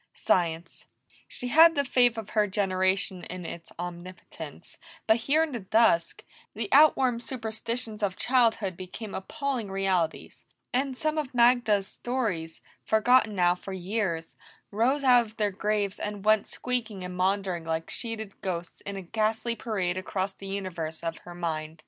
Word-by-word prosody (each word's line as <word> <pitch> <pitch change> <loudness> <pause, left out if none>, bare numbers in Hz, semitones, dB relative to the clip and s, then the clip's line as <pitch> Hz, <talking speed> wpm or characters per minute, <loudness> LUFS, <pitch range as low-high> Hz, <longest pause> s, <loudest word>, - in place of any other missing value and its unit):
Science! 170 -1 -1 0.4
She 250 - -4
had 330 +5 +7
the 280 - +1
faith 245 -2 +3
of 220 -2 -6
her 210 -1 +2
generation 190 -1 0
in 180 -1 -7
its 170 0 -8
omnipotence, 175 +1 -9 0.3
but 220 +1 +5
here 280 +7 +2
in 320 - -3
the 240 - -3
dusk, 195 -4 +2 0.3
the - - -3
outworn 265 -5 +5
superstitions 230 -2 -3
of 195 -3 0
childhood 230 -7 +2
became 190 +4 -8
appalling 255 +1 -3
realities, 190 -4 -1 0.3
and 260 +1 0
some 310 +1 0
of 270 -4 -5
Magda's 235 -4 +4
stories, 205 -11 -3 0.2
forgotten 220 0 +3
now 175 -1 +4
for 190 +2 -8
years, 185 -3 -2 0.4
rose 250 +7 +1
out 245 -3 +5
of 220 - -18
their 210 -2 +1
graves 205 0 -1
and 205 -1 -5
went 215 -1 +4
squeaking 230 -6 -3
and 180 0 -6
maundering 185 -2 0
like 160 0 -3
sheeted 220 -4 -5
ghosts 175 -2 -4
in 200 - -4
a 195 - -6
ghastly 220 +4 -1
parade 185 -6 -2
across 190 +1 -3
the 195 - -10
universe 175 -5 -4
of 165 -1 -3
her 175 - -11
mind. 160 -2 -4
205 Hz, 155 wpm, -28 LUFS, 180-235 Hz, 0.4 s, had